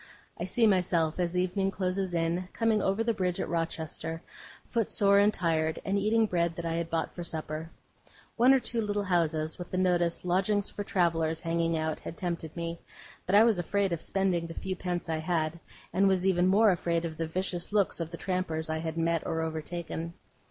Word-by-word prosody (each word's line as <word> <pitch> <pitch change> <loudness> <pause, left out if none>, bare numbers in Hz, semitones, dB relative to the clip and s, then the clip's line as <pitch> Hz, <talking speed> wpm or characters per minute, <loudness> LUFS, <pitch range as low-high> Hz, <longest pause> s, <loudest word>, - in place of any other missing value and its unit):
I - - -2
see 240 -2 +2
myself, 180 -5 +2
as 175 0 0
evening 185 +2 +1
closes 185 -1 -2
in, 170 +2 0
coming 225 -2 +2
over 195 +4 +1
the 230 0 +1
bridge 180 -4 -1
at - - -1
Rochester, 165 -1 -3 0.4
footsore 200 -3 +3
and 205 +1 +5
tired, 160 -4 0
and 195 - 0
eating 215 +3 +3
bread 170 -4 0
that 170 - -5
I 165 - -1
had 170 -1 -2
bought 165 -1 -1
for 175 - -6
supper. 160 -1 -4 0.7
One 245 +3 +6
or 270 - +6
two 235 -2 -2
little 205 -1 -1
houses, 160 -4 0
with 175 - -6
the 185 - -3
notice, 175 -2 +1
'Lodgings 195 +3 +1
for 205 - -4
Travellers', 165 -4 +1
hanging 165 -1 0
out, 155 0 -2
had 170 - -8
tempted 170 -4 -4
me; 170 0 -4 0.5
but 190 - +3
I 210 - +8
was 225 -5 +3
afraid 195 +1 0
of 165 - -3
spending 185 -4 0
the 165 - -8
few 190 -1 -3
pence 180 -1 -3
I 160 -1 -1
had, 160 0 -1 0.3
and 195 +2 +4
was 190 -1 +2
even 180 -1 +3
more 205 +3 +5
afraid 170 -1 0
of 160 -2 -5
the 165 0 -2
vicious 180 +2 -2
looks 205 -4 +2
of 165 -1 -3
the 170 - -7
trampers 165 -4 -2
I 160 - -1
had 160 0 -4
met 165 0 +1
or 160 0 -1
overtaken. 165 +1 -4
175 Hz, 200 wpm, -29 LUFS, 165-195 Hz, 0.7 s, I